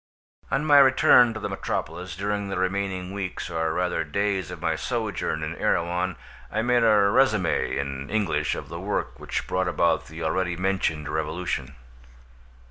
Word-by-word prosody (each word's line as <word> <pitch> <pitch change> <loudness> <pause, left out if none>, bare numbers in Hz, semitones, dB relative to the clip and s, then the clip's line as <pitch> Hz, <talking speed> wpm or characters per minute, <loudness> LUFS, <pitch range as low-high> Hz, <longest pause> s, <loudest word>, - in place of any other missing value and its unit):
On 135 +3 0
my 145 -2 +7
return 130 -3 +6
to - - -4
the - - -3
metropolis, 90 +4 -4
during 100 +1 -2
the 95 - -3
remaining 95 0 -2
weeks 95 -3 -4
or 80 -1 0
rather 90 0 0
days 95 +3 -1
of - - -7
my - - 0
sojourn 80 0 -2
in 75 +1 -4
Erewhon 90 +1 0 0.4
I 110 - 0
made 120 0 +3
a 115 - +4 0.2
resumé 110 -9 +2
in 70 0 -4
English 90 -9 0
of - - -7
the - - -7
work 60 0 -3
which - - -3
brought 95 0 -1
about 85 -2 +1
the 80 +2 -7
already 90 +2 0
mentioned 90 -5 -1
revolution. 80 -3 -3
90 Hz, 160 wpm, -25 LUFS, 80-100 Hz, 0.4 s, my